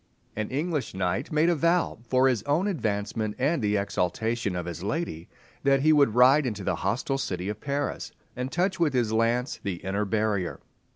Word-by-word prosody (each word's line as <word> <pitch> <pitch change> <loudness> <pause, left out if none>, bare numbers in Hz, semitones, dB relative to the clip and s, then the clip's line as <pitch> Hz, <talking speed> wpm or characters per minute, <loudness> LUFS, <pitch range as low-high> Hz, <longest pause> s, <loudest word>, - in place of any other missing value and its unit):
An 110 0 -3
English 150 - -2
knight 95 - -1
made 155 +2 +3
a 175 - +4
vow, 170 -1 +1
"for 130 +1 +4
his 125 -5 +1
own 155 +7 +2
advancement 110 - -2
and 140 +4 +1
the 105 -1 +1
exaltation 100 +2 -1
of 90 -1 -3
his 85 0 -6
lady," 100 - -3 0.3
that 135 -1 +3
he 155 +2 +5
would 140 -7 +4
ride 130 +3 +6
into 105 -4 -4
the - - -1
hostile 125 +7 -1
city 90 -5 -3
of 105 0 -5
Paris, 140 +1 -3 0.2
and 125 +2 -4
touch 185 +1 0
with 160 -4 +2
his 120 -4 +1
lance 115 +3 +1
the 100 -3 -2
inner 95 +4 -2
barrier. 105 -3 -1
120 Hz, 185 wpm, -27 LUFS, 100-145 Hz, 0.3 s, ride